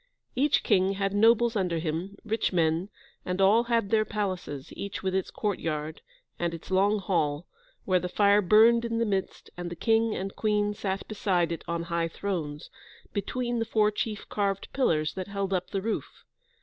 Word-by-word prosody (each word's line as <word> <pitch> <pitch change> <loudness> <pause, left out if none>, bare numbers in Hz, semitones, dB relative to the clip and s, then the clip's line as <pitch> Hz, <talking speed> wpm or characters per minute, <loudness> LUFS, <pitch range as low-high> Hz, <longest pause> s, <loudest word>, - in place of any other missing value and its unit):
Each 285 +3 +2
king 190 +1 +3
had 195 0 -1
nobles 230 +2 +4
under 180 -4 0
him, 165 +5 -3
rich 225 +1 0
men, 170 +1 +1 0.3
and 180 +1 -3
all 210 +5 +5
had 230 -4 0
their 220 -1 +4
palaces, 185 -10 -4
each 200 -1 -5
with 190 -1 -1
its 190 -1 -1
courtyard, 160 -7 -3 0.4
and 170 -1 -1
its 165 - -11
long 200 +3 +3
hall, 170 -5 0 0.4
where 185 -1 +3
the 180 +1 -4
fire 205 +2 +4
burned 225 +4 +5
in 230 -1 -2
the 230 - +1
midst, 195 -3 -3
and 175 0 -5
the 175 - -6
King 225 +4 +2
and 195 +1 -4
Queen 210 -1 +1
sat 195 -1 -3
beside 185 -5 0
it 165 - -4
on 170 0 -2
high 170 0 -1
thrones, 160 -5 -4 0.4
between 240 +4 -2
the - - +1
four 215 -1 +2
chief 210 0 -4
carved 200 -2 -1
pillars 155 - +1
that 185 -1 -5
held 200 -1 -2
up 185 -1 -1
the 195 -2 -3
roof. 225 0 -4
195 Hz, 180 wpm, -28 LUFS, 175-215 Hz, 0.4 s, all